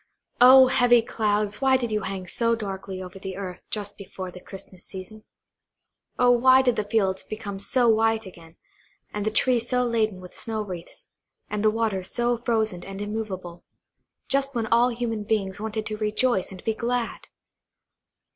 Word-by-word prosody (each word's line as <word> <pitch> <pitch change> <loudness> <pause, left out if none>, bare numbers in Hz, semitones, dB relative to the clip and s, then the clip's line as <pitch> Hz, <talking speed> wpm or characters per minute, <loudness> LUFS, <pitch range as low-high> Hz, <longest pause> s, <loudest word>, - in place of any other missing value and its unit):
Oh, 260 +1 +10
heavy 245 -2 +4
clouds, 210 -2 -1
why 265 -1 +4
did 240 -3 -3
you 210 0 0
hang 190 -1 -5
so 230 +5 +1
darkly 195 -3 -5
over 185 +1 -10
the 190 -1 -6
earth 185 -2 -6
just 205 -1 -5
before 185 -1 -7
the 180 - -11
Christmas 190 -1 -10
season? 205 +3 -9 0.9
Oh, 250 0 +5
why 260 +2 +6
did 250 -2 +2
the 210 - 0
fields 200 -3 0
become 205 -2 -6
so 240 +4 +2
white 225 0 +3
again, 170 -3 -13 0.6
and 210 0 -2
the - - +4
trees 240 +1 +1
so 250 -1 +2
laden 220 -5 0
with 180 -1 -12
snow 220 -2 -3
wreaths, 185 - -9 0.4
and 210 0 -2
the 215 - +5
waters 215 -4 -1
so 240 -1 0
frozen 220 -6 -1
and 195 0 -8
immovable, 200 -5 -5 0.6
just 275 0 0
when 230 -2 0
all 235 +2 +4
human 230 -3 -3
beings 205 -2 -1
wanted 220 0 -3
to 215 0 -4
rejoice 215 -1 0
and 185 -1 -10
be 225 - 0
glad? 235 +1 -2
215 Hz, 170 wpm, -25 LUFS, 195-235 Hz, 0.9 s, Oh